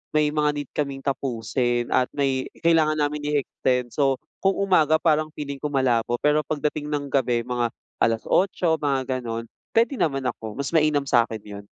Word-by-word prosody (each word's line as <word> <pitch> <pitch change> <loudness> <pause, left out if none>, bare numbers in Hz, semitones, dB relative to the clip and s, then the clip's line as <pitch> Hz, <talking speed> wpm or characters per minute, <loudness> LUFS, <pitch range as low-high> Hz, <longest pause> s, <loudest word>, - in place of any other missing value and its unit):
may 150 -1 +3
mga 150 0 +2
need 145 -2 -5
kaming 140 -2 -3
tapusin 120 -2 -1
at 125 - +3
may 135 -2 0 0.2
kailangan 160 -2 +4
namin 150 0 0 0.2
i-extend. 125 -3 0
So, 135 0 +2 0.2
kung 195 0 +2
umaga 180 -6 +3
parang 155 -1 +2
feeling 140 -2 -5
ko 150 - -2
malabo 125 -4 +1
pero 150 +1 +4
pagdating 150 0 -2
ng 145 -2 -3
gabi 125 -3 +1
mga 120 0 -1 0.3
8:00, 160 - +1
mga 135 -2 -1
ganon. 115 -2 -4 0.3
Pwede 235 +3 +2
naman 135 -4 0
ako, 110 -4 -4
mas 140 -1 -3
mainam 155 -3 +3
sa'kin 115 -5 +1
yun. 100 -1 -9
140 Hz, 165 wpm, -24 LUFS, 125-150 Hz, 0.3 s, kailangan